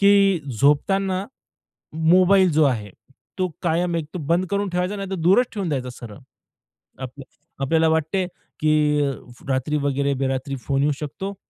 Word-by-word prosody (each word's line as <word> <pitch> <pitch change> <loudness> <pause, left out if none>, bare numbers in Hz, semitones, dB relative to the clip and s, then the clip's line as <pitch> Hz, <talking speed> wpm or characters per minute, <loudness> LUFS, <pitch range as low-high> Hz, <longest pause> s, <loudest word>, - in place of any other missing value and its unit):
की 200 -3 +5 0.2
झोपताना 190 +7 +2 0.9
मोबाईल 185 0 +5
जो 155 +1 +4
आहे, 110 -7 -1 0.5
तो 185 -1 +1
कायम 170 +1 +1
एक 160 - -3
तो - - -2
बंद 170 +5 +1
करून 200 0 0
ठेवायचा, 180 +3 -1
नाही 195 -1 -5
तर - - -1
दूरच 185 +9 +3
ठेवून 195 -5 -3
द्यायचा 130 -4 -2
सरळ. 120 -2 -10 0.8
आपलं 130 +1 -8 0.4
आपल्याला 160 +3 +3
वाटते 160 +4 0 0.3
की 155 0 +2 0.3
अ, 140 - 0 0.4
रात्री 135 +3 0
वगैरे 140 0 0
बेरात्री 135 0 -2
फोन 140 0 +1
येऊ 150 - +2
शकतो 190 +7 -5
160 Hz, 150 wpm, -22 LUFS, 140-190 Hz, 0.9 s, की